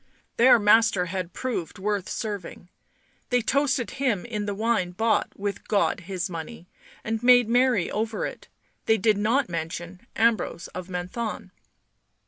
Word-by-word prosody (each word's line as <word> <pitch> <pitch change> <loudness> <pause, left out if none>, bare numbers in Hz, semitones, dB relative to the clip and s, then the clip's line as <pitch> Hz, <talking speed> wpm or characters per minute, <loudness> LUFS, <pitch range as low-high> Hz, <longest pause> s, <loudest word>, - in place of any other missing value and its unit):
Their 245 +2 +7
master 210 -3 +4
had 185 -1 -4
proved 225 -8 -4
worth 200 -1 -2
serving. 205 -4 -5 0.6
They 245 -2 +2
toasted 275 -2 +1
him 260 -9 -1
in 210 -3 -4
the 205 - -2
wine 215 -4 0
bought 225 +4 +1
with 200 0 -4
God 205 -1 +1
His 180 0 -4
money 175 +2 -8 0.4
and 225 0 -2
made 245 -1 +6
merry 245 -5 +2
over 220 0 -2
it; - - -8 0.4
they 225 - +4
did 210 0 +2
not 235 +6 +2
mention 175 +4 -6
Ambrose 225 -6 +1
of 185 0 -8
Menthon. 185 +3 -4
210 Hz, 140 wpm, -25 LUFS, 185-235 Hz, 0.6 s, Their